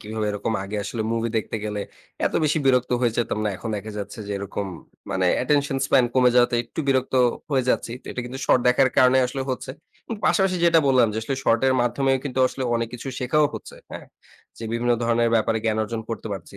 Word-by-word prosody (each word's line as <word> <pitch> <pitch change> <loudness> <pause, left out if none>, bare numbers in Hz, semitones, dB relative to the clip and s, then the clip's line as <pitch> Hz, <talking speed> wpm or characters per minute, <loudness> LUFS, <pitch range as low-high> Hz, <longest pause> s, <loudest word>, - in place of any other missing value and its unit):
কিভাবে 110 0 -4
এরকম 105 +2 -2
আগে 100 +2 -5
আসলে 115 +1 -3
মুভি 115 0 -1
দেখতে 110 0 -2
গেলে 105 -1 -3 0.5
এত - - -3
বেশি 155 +1 +2
বিরক্ত 125 -2 +3
হয়ে 120 -2 +2
যেতাম 115 -2 -1
না, - - +1
এখন 95 +5 -7
দেখা 105 +2 -6
যাচ্ছে 100 +3 -7
যে 100 - -4
এরকম 100 0 -4 0.4
মানে 95 -1 +1 0.2
attention 140 +1 +1
span 125 - +4
কমে 125 -1 +5
যাওয়াতে 125 0 +4
একটু 115 - -6
বিরক্ত 130 -1 +1 0.4
হয়ে 135 -3 +1
যাচ্ছি, 115 - -1
তো - - -24
এটা - - -4
কিন্তু 125 +2 -7
শর্ট 125 - +4
দেখার 130 +2 +4
কারণে 130 0 +5
আসলে 135 +2 -4
হচ্ছে। 130 - -4 0.4
উম 225 - -2
পাশাপাশি 190 -2 +2
যেটা 170 -1 +5
বললাম 130 -3 +5
যে, - - -5
আসলে 135 +5 -2
শর্টের 115 +3 +3
মাধ্যমেও 135 +2 +1
কিন্তু 130 -2 -4
আসলে 135 - -6
অনেক 115 -1 -1
কিছু 125 +3 -7
শেখাও 150 +4 +2
হচ্ছে, - - -9
হ্যাঁ, - - -8 0.5
যে 115 - -6
বিভিন্ন 120 +1 +1
ধরণের 115 0 +2
ব্যাপারে 115 0 +2
জ্ঞান 110 -1 +1
অর্জন 110 +1 -4
করতে 115 - -5
পারছি। 100 0 -8
120 Hz, 210 wpm, -23 LUFS, 110-130 Hz, 0.5 s, কমে